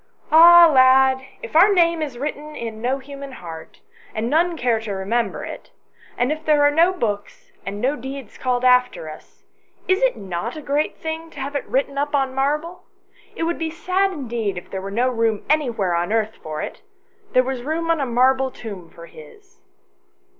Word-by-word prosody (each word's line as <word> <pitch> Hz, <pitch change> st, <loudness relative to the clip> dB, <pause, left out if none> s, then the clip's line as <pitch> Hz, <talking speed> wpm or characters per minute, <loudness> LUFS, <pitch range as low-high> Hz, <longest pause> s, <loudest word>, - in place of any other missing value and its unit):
" -, -, -36 dB
Ah, 340 Hz, +2 st, +9 dB
lad, 260 Hz, 0 st, +5 dB, 0.2 s
if 470 Hz, -, -9 dB
our 375 Hz, +6 st, +7 dB
name 335 Hz, -3 st, +3 dB
is 280 Hz, -6 st, -4 dB
written 300 Hz, +2 st, -5 dB
in 225 Hz, -2 st, -6 dB
no 255 Hz, +3 st, 0 dB
human 275 Hz, 0 st, -9 dB
heart, 165 Hz, -8 st, -10 dB, 0.3 s
and 225 Hz, +3 st, -2 dB
none 335 Hz, +2 st, +2 dB
care 240 Hz, -4 st, +1 dB
to 220 Hz, -1 st, -6 dB
remember 210 Hz, +5 st, -2 dB
it, -, -, -9 dB, 0.5 s
and 245 Hz, +3 st, +1 dB
if 310 Hz, +1 st, -4 dB
there 300 Hz, -2 st, +3 dB
are 290 Hz, -, +5 dB
no 335 Hz, +4 st, +4 dB
books 210 Hz, -, -4 dB, 0.2 s
and 200 Hz, +1 st, -4 dB
no 265 Hz, +6 st, 0 dB
deeds 265 Hz, -2 st, -8 dB
called 250 Hz, -1 st, -1 dB
after 250 Hz, -10 st, +2 dB
us, 155 Hz, -, -15 dB, 0.4 s
is 375 Hz, +3 st, +2 dB
it -, -, +2 dB
not 195 Hz, -, -5 dB
a -, -, -6 dB
great 290 Hz, +2 st, -1 dB
thing 320 Hz, +1 st, -5 dB
to 300 Hz, -, -12 dB
have 275 Hz, +2 st, -5 dB
it 285 Hz, -, -3 dB
written 275 Hz, +3 st, -1 dB
up 290 Hz, +1 st, -1 dB
on 270 Hz, -2 st, 0 dB
marble? 300 Hz, +6 st, -1 dB, 0.5 s
It -, -, -3 dB
would 340 Hz, +1 st, -1 dB
be 325 Hz, -1 st, -2 dB
sad 370 Hz, +4 st, 0 dB
indeed 235 Hz, -, -3 dB
if 175 Hz, -, -9 dB
there 190 Hz, -, -4 dB
were 195 Hz, -, -6 dB
no 235 Hz, +5 st, +1 dB
room 230 Hz, -4 st, 0 dB
anywhere 235 Hz, -, +1 dB
on 175 Hz, +3 st, -1 dB
earth 220 Hz, -1 st, 0 dB
for 155 Hz, -1 st, -5 dB
it: -, -, -7 dB, 0.5 s
there 255 Hz, -, +5 dB
was 260 Hz, -1 st, -4 dB
room 325 Hz, +5 st, -1 dB
on 325 Hz, -3 st, +1 dB
a -, -, 0 dB
marble 260 Hz, +2 st, +2 dB
tomb 200 Hz, -9 st, -9 dB
for 170 Hz, -, -13 dB
his." 385 Hz, -, -16 dB
265 Hz, 195 wpm, -21 LUFS, 225-310 Hz, 0.5 s, Ah